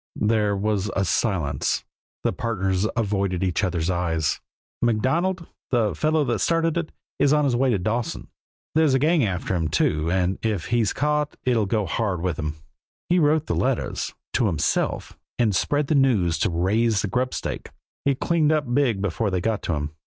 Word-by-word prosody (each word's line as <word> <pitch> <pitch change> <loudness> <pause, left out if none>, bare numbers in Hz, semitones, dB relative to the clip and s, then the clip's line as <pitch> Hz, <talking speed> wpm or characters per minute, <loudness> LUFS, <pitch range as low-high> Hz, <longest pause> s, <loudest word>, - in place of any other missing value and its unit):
There 105 -2 +1
was 105 0 0
a 95 - +1
silence; 90 -8 0 0.4
the - - +1
partners 100 -5 -1
avoided 100 -5 0
each 90 +1 0
other's 90 -2 0
eyes. 80 -4 0 0.4
"MacDonald, 165 - +1 0.2
the 115 -5 +2
fellow 155 0 +1
that 120 -5 -1
started 165 -1 +1
it, 170 -2 -2 0.3
is 140 - +4
on 150 -1 +3
his 130 -3 +2
way 130 +2 +2
to 115 - +2
Dawson. 110 +5 -2 0.5
There's 155 -4 +4
a - - +5
gang 155 +2 +3
after 95 -3 -1
him, 80 -2 0
too, 75 +1 +1
and 90 +1 0
if 105 -7 -1
he's 115 -3 +2
caught 150 +1 0
it'll 115 -5 +2
go 105 0 0
hard 95 -1 -1
with 90 -5 -1
him. 75 0 -3 0.5
He 180 +1 +4
wrote 155 0 +3
the - - -1
letters 130 -1 -1 0.2
to 120 - +2
himself 80 -7 -1 0.2
and 110 -5 +2
spread 145 +9 +1
the 145 - 0
news 130 - +3
just 80 -2 -2
to - - +2
raise 100 +5 +1
a - - 0
grubstake. 125 +6 -2 0.3
He 140 -1 +2
cleaned 160 +1 +2
up 145 -6 0
big 120 -8 +2
before 105 +3 0
they 95 -1 0
got 110 +1 -2
onto - - +2
him. 75 +1 -6
110 Hz, 180 wpm, -24 LUFS, 95-135 Hz, 0.5 s, a